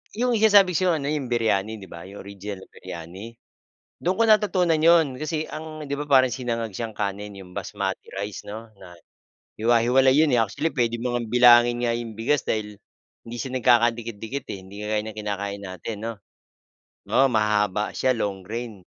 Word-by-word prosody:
yung 245 Hz, +2 st, +1 dB
sinasabi 205 Hz, -4 st, +6 dB
ko 185 Hz, +3 st, +2 dB
sayo -, -, +4 dB
ano 140 Hz, -1 st, -3 dB
yung 145 Hz, -4 st, -2 dB
biryani, 110 Hz, -3 st, 0 dB
di 95 Hz, -, -10 dB
ba? 85 Hz, 0 st, -9 dB
Yung 100 Hz, +1 st, -10 dB
original 100 Hz, -1 st, -8 dB
na -, -, -16 dB
biryani. 95 Hz, +8 st, -9 dB, 0.6 s
Doon 180 Hz, -, 0 dB
ko 230 Hz, -, +2 dB
natutunan 185 Hz, -6 st, +3 dB
yo'n 165 Hz, 0 st, +5 dB
kasi 155 Hz, 0 st, -3 dB
ang 155 Hz, 0 st, -7 dB
'di 140 Hz, -, -1 dB
ba 145 Hz, -, -4 dB
parang 130 Hz, -3 st, +5 dB
sinangag 120 Hz, -2 st, -3 dB
siyang 115 Hz, -2 st, -4 dB
kanin 105 Hz, 0 st, -4 dB
yung 95 Hz, -2 st, -12 dB
basmati -, -, -4 dB
rice 100 Hz, 0 st, -5 dB
'no, 110 Hz, +2 st, -8 dB
na 90 Hz, -2 st, -13 dB, 0.7 s
hiwa-hiwalay 120 Hz, +3 st, +4 dB
yo'n 155 Hz, -3 st, +4 dB
eh, 120 Hz, -, +4 dB
actually 115 Hz, +9 st, -2 dB
puwede 120 Hz, -4 st, 0 dB
mo 120 Hz, +1 st, -3 dB, 0.2 s
bilangin 120 Hz, 0 st, +6 dB
nga 115 Hz, -, +1 dB
yung 115 Hz, -2 st, -5 dB
bigas 130 Hz, +5 st, +1 dB
dahil 105 Hz, -2 st, -4 dB, 0.4 s
hindi 115 Hz, +1 st, -9 dB
siya 130 Hz, +1 st, -5 dB
nagkakadikit-dikit 120 Hz, +1 st, +1 dB
eh, -, -, -4 dB
hindi 100 Hz, +2 st, -10 dB
kagaya 105 Hz, 0 st, -1 dB
ng 110 Hz, -1 st, -8 dB
kinakain 100 Hz, -1 st, -4 dB
natin, 95 Hz, +3 st, -6 dB
'no? 115 Hz, +1 st, -3 dB, 1.0 s
Oo, 135 Hz, -, +5 dB
mahahaba 105 Hz, -3 st, +1 dB
siya, 130 Hz, -1 st, +1 dB
long 100 Hz, -3 st, -2 dB
grain. 115 Hz, 0 st, -5 dB
115 Hz, 180 wpm, -24 LUFS, 105-135 Hz, 1.0 s, sinasabi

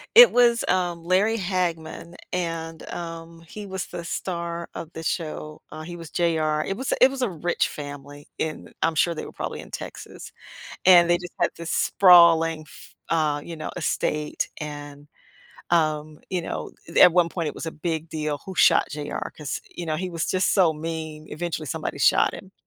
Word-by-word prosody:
it 485 Hz, +1 st, +11 dB
was, 240 Hz, -1 st, +4 dB
um, 175 Hz, -2 st, 0 dB
Larry 195 Hz, +6 st, +2 dB
Hagman, 175 Hz, -3 st, -3 dB, 0.2 s
and, 165 Hz, -2 st, -3 dB
um, 165 Hz, -1 st, -7 dB
he 210 Hz, +4 st, -8 dB
was 190 Hz, -1 st, -4 dB
the 170 Hz, -, -7 dB
star 170 Hz, -1 st, -4 dB
of 165 Hz, -, -7 dB
the 160 Hz, -, -7 dB
show 155 Hz, -2 st, -4 dB
uh, 155 Hz, 0 st, -7 dB
he 175 Hz, +2 st, -7 dB
was 165 Hz, -2 st, -9 dB
J.R. 155 Hz, -3 st, +1 dB
It 195 Hz, -, -2 dB
was 265 Hz, -, -1 dB
it 260 Hz, -, +7 dB
was 270 Hz, -1 st, -5 dB
a 250 Hz, -, +1 dB
rich 175 Hz, 0 st, 0 dB
family 145 Hz, 0 st, -9 dB
in 155 Hz, -1 st, -4 dB
I'm 165 Hz, 0 st, +1 dB
sure 170 Hz, +2 st, +2 dB
they 160 Hz, -, -6 dB
were -, -, -9 dB
probably -, -, -5 dB
in -, -, -10 dB
Texas, -, -, -8 dB, 0.5 s
and 175 Hz, -2 st, +8 dB
they 175 Hz, -, +4 dB
just 180 Hz, -1 st, -9 dB
had 175 Hz, -, +2 dB
this 170 Hz, 0 st, -6 dB
sprawling 170 Hz, -3 st, +6 dB
f -, -, -15 dB
uh, 155 Hz, -3 st, +1 dB
you 170 Hz, -, -7 dB
know, 155 Hz, -, -5 dB
estate, 150 Hz, -2 st, -1 dB
and, 145 Hz, -1 st, -8 dB, 0.6 s
um, 155 Hz, -2 st, +1 dB
you 180 Hz, -2 st, -1 dB
know, -, -, -5 dB, 0.2 s
i -, -, -10 dB
th -, -, -2 dB
at 180 Hz, -, +4 dB
one 175 Hz, -1 st, +4 dB
point, 170 Hz, -2 st, -3 dB
it -, -, -5 dB
was -, -, -6 dB
a 160 Hz, -, -3 dB
big 160 Hz, +1 st, -3 dB
deal 150 Hz, -2 st, -3 dB
who 190 Hz, -, -6 dB
shot -, -, +5 dB
J.R., 145 Hz, 0 st, -4 dB
'cause, 150 Hz, -2 st, -4 dB
you 175 Hz, -, -6 dB
know, 155 Hz, -1 st, -1 dB
he 185 Hz, +3 st, -3 dB
was 165 Hz, -2 st, -2 dB
just 185 Hz, 0 st, +2 dB
so 180 Hz, -5 st, +4 dB
mean, 155 Hz, 0 st, -6 dB
eventually 160 Hz, 0 st, -4 dB
somebody 130 Hz, -, -4 dB
shot -, -, +4 dB
him, -, -, -10 dB
165 Hz, 195 wpm, -24 LUFS, 155-175 Hz, 0.6 s, it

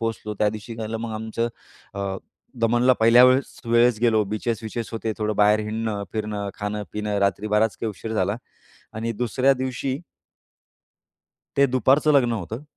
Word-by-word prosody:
पोहोचलो 110 Hz, -2 st, -3 dB
त्यादिवशी 110 Hz, +2 st, -1 dB
झालं 115 Hz, 0 st, -4 dB
मग 115 Hz, -1 st, -5 dB
आमचं 110 Hz, +2 st, -2 dB, 0.5 s
अ, 100 Hz, -1 st, -3 dB, 0.4 s
दमनला 120 Hz, +2 st, +4 dB
पहिल्या 115 Hz, +2 st, +7 dB
वेळेस 130 Hz, +1 st, +2 dB
वेळेस 120 Hz, -1 st, +4 dB
गेलो 115 Hz, -3 st, +3 dB
बीचेस-विचेस 110 Hz, +2 st, -3 dB
होते, 110 Hz, 0 st, -2 dB
थोडं 105 Hz, -1 st, -1 dB
बाहेर 105 Hz, +1 st, +4 dB
हिंडणं, 110 Hz, -1 st, -3 dB
फिरणं, 105 Hz, -2 st, -3 dB
खाणं-पिणं, 105 Hz, 0 st, -3 dB
रात्री 100 Hz, +2 st, +1 dB
बराच 105 Hz, +1 st, +2 dB
काही 115 Hz, -, -3 dB
उशीर 110 Hz, +3 st, -7 dB
झाला. 100 Hz, +2 st, 0 dB, 0.6 s
आणि 115 Hz, +1 st, -3 dB
दुसऱ्या 125 Hz, +4 st, +2 dB
दिवशी 130 Hz, +1 st, -3 dB, 1.6 s
ते 140 Hz, -, +5 dB
दुपारचं 135 Hz, +4 st, +3 dB
लग्न 125 Hz, -4 st, +4 dB
होतं. 110 Hz, -, -5 dB
110 Hz, 140 wpm, -23 LUFS, 105-120 Hz, 1.6 s, पहिल्या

